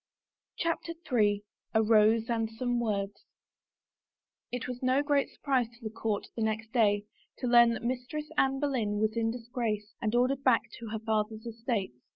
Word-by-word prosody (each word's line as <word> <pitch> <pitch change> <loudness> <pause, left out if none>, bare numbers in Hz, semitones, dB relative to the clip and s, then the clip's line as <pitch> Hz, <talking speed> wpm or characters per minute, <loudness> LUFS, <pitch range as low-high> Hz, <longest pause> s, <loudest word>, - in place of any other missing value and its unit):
CHAPTER 335 0 -1 0.2
III 205 -3 +3 0.3
A 220 - +5
ROSE 220 +1 +4
AND 225 -2 0
SOME 245 +2 -1
WORDS 200 -3 -2 1.3
IT 245 0 -3
was 250 0 -5
no 260 +2 +3
great 285 -1 +2
surprise 265 -5 0
to 235 +1 -20
the 220 - -4
court, 220 -2 -2
the 230 - -3
next 220 0 -1
day, 205 -4 +3 0.3
to - - -4
learn 240 -1 +7
that - - -7
Mistress 255 +5 -3
Anne 270 0 +2
Boleyn 245 -8 0
was 215 +1 +1
in 225 -1 +1
disgrace 230 -3 -3
and 220 0 0
ordered 255 +3 +2
back 250 -4 +5 0.2
to 230 - -7
her 220 +1 -3
father's 220 0 -1
estates. 225 - -3
230 Hz, 170 wpm, -30 LUFS, 215-250 Hz, 1.3 s, learn